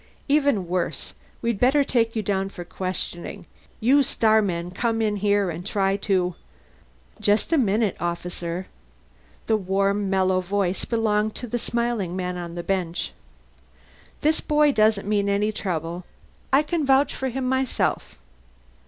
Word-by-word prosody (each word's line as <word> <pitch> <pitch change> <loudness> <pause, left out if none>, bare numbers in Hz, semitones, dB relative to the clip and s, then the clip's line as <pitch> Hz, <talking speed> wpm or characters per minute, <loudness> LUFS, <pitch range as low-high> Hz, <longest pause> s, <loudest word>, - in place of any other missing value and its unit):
"Even 280 - +2
worse. 180 +1 -2 0.3
We'd 230 -3 0
better 275 +3 +4
take 230 -4 +1
you 220 - -1
down 195 -1 0
for 175 -3 -8
questioning. 185 +1 -5 0.3
You 270 +6 +5
starmen 205 -9 +2
come 225 +3 -1
in 210 -2 +1
here 200 -2 +2
and 165 +2 -6
try 195 -1 +1
to 185 -3 +1 0.4
" 60 -1 -32
"Just 205 +9 +2
a - - +5
minute, 215 -3 +2
officer." 175 +1 -3 0.8
The 220 - +2
warm 195 +1 0
mellow 190 -1 +2
voice 190 0 -1
belonged 215 -2 +1
to - - -5
the 240 +1 -2
smiling 235 -7 -1
man 180 -1 -2
on 175 -1 -6
the 175 - -4
bench. 180 -2 -2 1.1
"This 310 +1 +2
boy 300 -1 +3
doesn't 215 -4 +2
mean 205 -1 +1
any 205 +2 +1
trouble. 175 -4 -3 0.5
I 275 +3 +5
can 320 +1 -1
vouch 270 +1 +3
for 265 - -2
him 255 +1 -2
myself." 260 0 0
205 Hz, 145 wpm, -24 LUFS, 185-235 Hz, 1.1 s, You